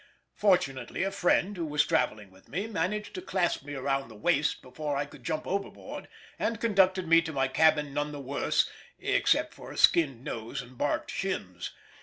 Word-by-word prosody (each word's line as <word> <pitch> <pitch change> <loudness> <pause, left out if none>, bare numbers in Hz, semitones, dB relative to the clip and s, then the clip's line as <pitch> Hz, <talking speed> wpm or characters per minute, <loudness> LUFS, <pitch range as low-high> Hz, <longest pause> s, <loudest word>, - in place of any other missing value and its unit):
Fortunately 135 - +1
a 195 - 0
friend 195 +1 +2
who 170 -3 -2
was 150 0 +2
travelling 105 - 0
with 95 0 -20
me 195 +3 -2
managed 210 0 -2
to 365 - -5
clasp 180 - 0
me 145 0 -6
round 135 -1 -1
the 110 - -12
waist 150 +6 +1
before 145 +2 -3
I 140 - 0
could 140 -3 -15
jump 155 +5 -2
overboard, 195 +1 -4 0.3
and 225 -2 0
conducted 190 -5 +3
me 165 +1 +7
to 160 - -5
my 135 -3 +1
cabin 150 -1 +3
none 145 +1 -1
the 145 - -6
worse, 140 +1 +1 0.3
except - - +2
for - - -10
a - - -9
skinned 135 -8 +4
nose 115 -6 -4
and 125 0 -9
barked 145 - -1
shins. 90 - -3
150 Hz, 185 wpm, -29 LUFS, 135-185 Hz, 0.3 s, me